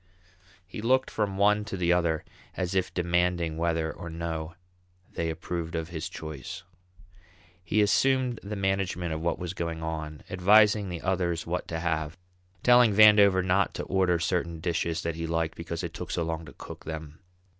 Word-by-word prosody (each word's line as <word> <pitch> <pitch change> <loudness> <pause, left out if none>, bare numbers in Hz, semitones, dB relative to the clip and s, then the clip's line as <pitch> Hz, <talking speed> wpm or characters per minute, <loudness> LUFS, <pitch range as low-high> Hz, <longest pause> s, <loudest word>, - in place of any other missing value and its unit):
He 95 +4 -8
looked 130 +3 +2
from 100 -3 -1
one 105 +1 +3
to 100 - -5
the 90 -1 +2
other 85 -3 0 0.3
as 90 0 -2
if 95 -1 0
demanding 85 -2 0
whether 80 -1 0
or 85 -1 -8
no 80 0 -4 0.6
they 85 0 -2
approved 85 0 -4
of 80 0 -3
his 85 +1 -5
choice. 80 +2 -7 1.0
He 105 +5 +2
assumed 130 +3 +2
the 105 +2 -5
management 95 -3 -1
of 80 - -4
what 85 - 0
was 90 0 -5
going 85 -3 -4
on, 80 -2 -5
advising 105 +2 +4
the 85 -2 -5
others 90 -2 -1
what 90 +2 -3
to 80 - -3
have, 80 -2 -2 0.5
telling 120 -4 +6
Vandover 100 -3 +7
not 95 +1 +2
to - - -3
order 95 -2 +2
certain 85 -1 -1
dishes 85 -1 -1
that 85 - -1
he 80 +1 -4
liked 80 -1 -1
because 85 +1 -5
it 85 -1 -4
took 90 - -7
so 85 - -1
long 80 0 -3
to 70 - -12
cook - - -10
them. 80 -1 -7
85 Hz, 175 wpm, -28 LUFS, 80-95 Hz, 1.0 s, Vandover